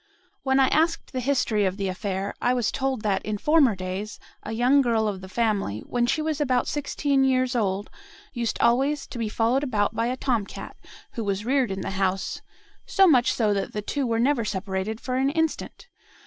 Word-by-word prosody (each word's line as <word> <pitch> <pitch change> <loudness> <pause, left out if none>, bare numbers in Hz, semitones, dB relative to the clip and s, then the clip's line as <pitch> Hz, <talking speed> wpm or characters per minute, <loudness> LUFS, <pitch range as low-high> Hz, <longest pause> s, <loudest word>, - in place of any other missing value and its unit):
When 265 0 +2
I 265 - +5
asked 325 0 +1
the 260 - -1
history 250 -5 +1
of 190 0 0
the 200 -1 -2
affair, 195 +1 -3
I 245 +1 +2
was 240 -4 0
told 265 -4 -2
that, 195 -2 0
in 215 -1 -2
former 290 -3 +4
days, 185 +3 -5 0.2
a 215 - -7
young 250 +5 +4
girl 230 -4 +1
of 195 -3 -3
the 190 - -10
family, 200 - -1
when 240 -1 -1
she 310 +5 0
was 310 -1 -1
about 255 -3 +1
sixteen 285 -1 0
years 255 -1 +2
old, 205 -3 -1 0.4
used 235 -3 -2
always 275 +5 +2
to 240 - -8
be 225 -2 -1
followed 235 +6 +1
about 215 -6 0
by 230 +1 0
a 255 +1 -2
tom 235 -7 0
cat, - - -9 0.4
who 230 - -4
was 200 0 -2
reared 265 0 +2
in 190 0 -4
the - - -4
house, 190 -1 -1 0.5
so 390 - +5
much 260 -9 +5
so 215 -3 +1
that 195 -1 -3
the 210 - -3
two 275 +3 -2
were 230 -1 0
never 245 +1 +2
separated 195 +1 -3
for 255 0 -3
an 270 +1 +2
instant. 320 +9 -2
235 Hz, 205 wpm, -25 LUFS, 205-265 Hz, 0.5 s, I